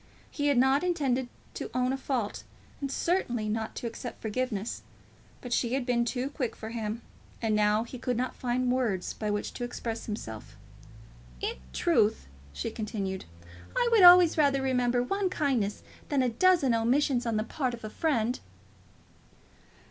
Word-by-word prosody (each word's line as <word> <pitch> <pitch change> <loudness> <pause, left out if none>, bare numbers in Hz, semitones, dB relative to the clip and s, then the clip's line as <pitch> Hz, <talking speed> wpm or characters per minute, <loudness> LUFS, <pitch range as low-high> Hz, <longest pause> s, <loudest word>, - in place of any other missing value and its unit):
He 290 -2 -1
had 285 -3 +3
not 265 +5 +4
intended 270 -8 0 0.2
to - - -5
own 255 +1 +2
a - - -1
fault, 255 -6 -2 0.4
and 275 -1 -3
certainly 245 - 0
not 220 +1 -2
to - - -5
accept 235 +2 -6
forgiveness; 225 -1 -2 0.6
but 245 -1 -4
she 240 0 +1
had 270 -2 -1
been 240 -1 +2
too 255 +3 -2
quick 260 -5 -3
for 220 - -7
him; 225 0 -4 0.4
and 220 -2 +1
now 210 +1 +3
he 245 +1 -9
could 245 -1 -1
not 255 +1 -1
find 250 0 0
words 230 -8 0
by 215 - -3
which 205 0 -2
to 245 - -5
express 235 -1 -4
himself. 110 - -6 0.8
"In - - -3
truth," 65 +1 +2 0.3
she 70 +1 -4
continued, 200 -3 -4 0.5
"I 485 -1 +3
would 450 -3 +6
always 355 -2 +8
rather 275 -2 +3
remember 250 -2 +2
one 390 +8 0
kindness 255 - 0 0.3
than 280 -3 +2
a 250 - +2
dozen 285 +1 +4
omissions 245 +2 +2
on 225 -2 0
the 215 - +1
part 250 +1 -2
of 230 - -16
a 215 - -4
friend." 250 -6 0
245 Hz, 165 wpm, -29 LUFS, 220-270 Hz, 0.8 s, always